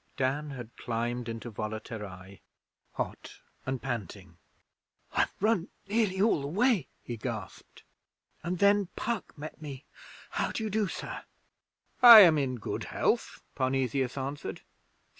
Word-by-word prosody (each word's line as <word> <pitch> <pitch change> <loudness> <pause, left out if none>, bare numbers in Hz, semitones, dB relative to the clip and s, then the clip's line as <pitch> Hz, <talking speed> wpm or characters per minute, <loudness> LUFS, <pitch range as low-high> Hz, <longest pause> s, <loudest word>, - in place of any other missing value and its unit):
Dan 140 +3 0
had 120 -4 -8
climbed 120 0 -2
into 115 +1 -6
Volaterrae, 105 -3 -7 0.5
hot - - -5 0.3
and 130 -1 -1
panting. 100 -8 -5 0.7
'I've - - +2
run 200 -4 +2 0.2
nearly 205 -3 +1
all 205 -7 +3
the 140 - -4
way,' 200 - +2 0.2
he 120 - -5
gasped, 105 - -7 0.6
'and 175 +2 -2
then 200 0 +4
Puck 230 -8 -3
met 155 +1 -8
me. 140 -3 -8 0.5
How - - -1
do 220 - -3
you 215 - -2
do, 215 0 +1
Sir?' - - -6 0.8
'I 235 -3 +13
am 165 -5 +7
in 130 -2 -1
good 115 - -4
health,' - - -1
Parnesius 130 -1 0
answered. 140 +2 -4
135 Hz, 130 wpm, -29 LUFS, 120-190 Hz, 0.8 s, I